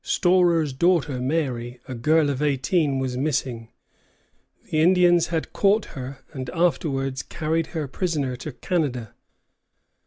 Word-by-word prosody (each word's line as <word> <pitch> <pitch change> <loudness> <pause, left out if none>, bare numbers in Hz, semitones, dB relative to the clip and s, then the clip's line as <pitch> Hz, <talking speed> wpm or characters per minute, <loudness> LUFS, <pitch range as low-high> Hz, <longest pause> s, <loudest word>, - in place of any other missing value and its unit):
Storer's 175 -5 +2
daughter 150 -3 +1
Mary, 125 -4 -2
a 130 - -5
girl 150 +5 +2
of 135 0 -4
eighteen, 145 +1 +1
was 130 -1 -2
missing. 130 -5 -2 0.9
The 155 - 0
Indians 175 0 +4
had 165 -2 -3
caught 205 +2 +3
her, 135 -1 -7
and 130 -3 -5
afterwards 135 -4 0
carried 160 0 -2
her 160 -4 -4
prisoner 145 -3 -2
to 155 - -6
Canada. 125 - -2
145 Hz, 125 wpm, -24 LUFS, 130-165 Hz, 0.9 s, Indians